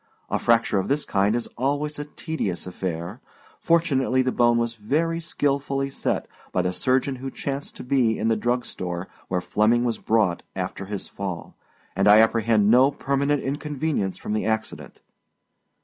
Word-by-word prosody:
A - - +1
fracture 115 -3 +3
of 95 - -2
this 145 +2 0
kind 100 +2 +2
is 120 - -1
always 145 +3 -1
a 145 - -4
tedious 150 - -4
affair. 90 +4 -5 0.4
Fortunately 135 -6 +2
the 130 - 0
bone 120 -1 +3
was 115 0 0
very 155 +10 0
skilfully 140 -3 -1
set - - -2 0.2
by 90 - +1
the 90 0 -1
surgeon 130 +5 +1
who 135 +2 -5
chanced 140 +1 -5
to - - -8
be 125 -4 +2
in 110 - -1
the 115 - +3
drugstore 105 -6 -2 0.2
where 90 -1 -1
Flemming 110 +5 +2
was 120 -2 -1
brought 105 -6 +1
after 95 +1 -4
his 100 0 -5
fall, 95 -4 -6 0.4
and 95 +2 +2
I 105 +1 +8
apprehend 110 -1 +4
no 130 +3 +6
permanent 140 0 0
inconvenience 145 -7 -2
from 105 - -4
the 110 - 0
accident. 110 0 -3
120 Hz, 165 wpm, -24 LUFS, 105-140 Hz, 0.4 s, I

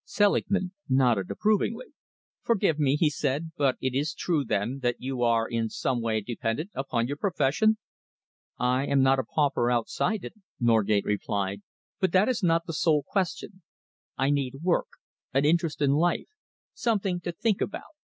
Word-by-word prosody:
Selingman 200 -2 +1 0.2
nodded 125 -8 +2
approvingly. 215 - 0 0.5
"Forgive 200 -9 +1
me," 140 -2 +3
he 155 +1 +3
said, 150 +2 -2
"but 135 -3 +1
it 130 -1 -2
is 145 +4 -1
true, 160 -5 0
then, 110 +4 -1
that 120 -1 +1
you 130 -1 -4
are 115 -1 +2
in 115 -2 -1
some 125 +2 -1
way 110 -1 0
dependent 120 - -3
upon 130 -6 -1
your 140 +3 -4
profession?" 200 +5 +2 0.8
"I 125 +2 +1
am 140 -1 +3
not 135 0 +4
a - - 0
pauper 135 -1 +1
outside 125 - 0
it," - - -7 0.3
Norgate 110 -3 +2
replied, 100 -1 -2 0.4
"but 190 -3 +1
that 190 +3 +4
is 250 -3 0
not 165 -2 +2
the 165 - -5
sole 155 -2 +2
question. 190 0 -3 0.6
I 135 +2 +2
need 135 0 -2
work, 180 -1 +1 0.5
an 135 +1 +3
interest 165 -1 +1
in 140 - +3
life, 170 +5 +1 0.4
something 200 -6 0
to 175 - -4
think 205 +4 -1
about. 205 - -4
140 Hz, 160 wpm, -27 LUFS, 120-175 Hz, 0.8 s, not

